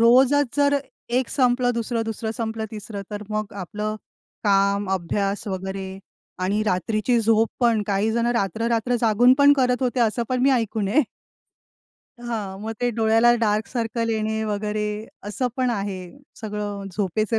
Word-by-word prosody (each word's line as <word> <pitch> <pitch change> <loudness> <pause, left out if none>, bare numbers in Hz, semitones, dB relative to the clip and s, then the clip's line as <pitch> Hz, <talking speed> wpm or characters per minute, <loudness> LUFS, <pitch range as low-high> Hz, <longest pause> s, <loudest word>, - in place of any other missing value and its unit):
रोजच 260 +4 +5
जर 285 0 +4 0.3
एक 250 +1 0
संपलं 250 -2 +2
दुसरं, 230 0 -1
दुसरं 220 0 -3
संपलं 225 -1 -3
तिसरं. 210 -1 -6
तर 210 0 -5
मग 215 -1 -2
आपलं 210 +3 -4 0.5
काम 200 0 +2
अभ्यास 195 +3 -1
वगैरे 190 0 -5 0.4
आणि 205 +3 +1
रात्रीची 215 +5 +1
झोप 225 0 +3
पण 230 -3 +3
काहीजणं 220 +4 +1
रात्र-रात्र 230 +3 0
जागून 235 +3 +5
पण 285 0 +7
करत 250 0 +2
होते 250 0 0
असं 235 +1 +2
पण 255 -1 0
मी 275 - +5
ऐकून 225 -5 0
आहे. 275 +7 +3 1.2
हां, 215 -5 -4
मग 225 - -3
ते 245 - +2
डोळ्याला 225 +1 +5
डार्क 215 -1 +1
सर्कल 230 -1 -2
येणे 220 0 -1
वगैरे 210 0 -2 0.4
असं 250 +5 -1
पण 255 -1 +1
आहे. 195 0 -4 0.2
सगळं 205 -2 -4
झोपेचे 215 +3 0
220 Hz, 145 wpm, -23 LUFS, 205-240 Hz, 1.2 s, पण